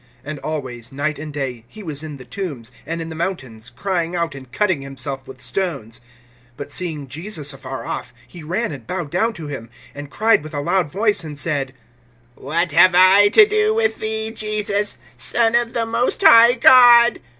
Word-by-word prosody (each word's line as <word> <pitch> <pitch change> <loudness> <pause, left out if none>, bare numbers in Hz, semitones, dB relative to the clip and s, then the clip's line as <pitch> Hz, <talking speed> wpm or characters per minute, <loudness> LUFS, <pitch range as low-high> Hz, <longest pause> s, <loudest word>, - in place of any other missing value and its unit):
(5)And 150 0 -6
always, 130 -6 -5
night 145 +2 -3
and 155 0 -7
day, 130 -5 -5
he 215 - -12
was 150 -5 -5
in 155 -2 -8
the 130 - -13
tombs, 135 - -6 0.2
and 165 +1 -4
in 165 - -8
the - - -7
mountains, 130 - -5
crying 175 +4 -3
out, 170 -1 -2
and 130 -2 -12
cutting 185 -4 0
himself 135 0 -7
with 130 -1 -12
stones. 135 - -4 0.6
(6)But 145 - -8
seeing 155 -4 -2
Jesus 155 0 -5
afar 135 0 -8
off, - - -5 0.2
he 175 - -12
ran 185 +8 -2
and 130 -6 -10
bowed 170 -6 -4
down 225 +6 0
to 165 -7 -9
him, 135 -6 -7 0.3
(7)and 145 0 -8
cried 220 +4 +2
with 155 0 -9
a - - -2
loud 175 0 0
voice, 210 +1 0
and 150 -2 -8
said: 140 -3 -2 0.6
What 165 +7 -2
have 175 +3 +5
I 190 +3 +6
to 420 - +7
do 430 +1 +1
with 460 0 0
thee, 220 0 -3
Jesus, 210 -2 -2 0.2
Son 230 -1 +1
of 235 -1 +1
the 230 -1 0
most 230 +2 -1
high 230 +1 +8
God? 240 -1 +7
165 Hz, 190 wpm, -19 LUFS, 140-210 Hz, 0.6 s, high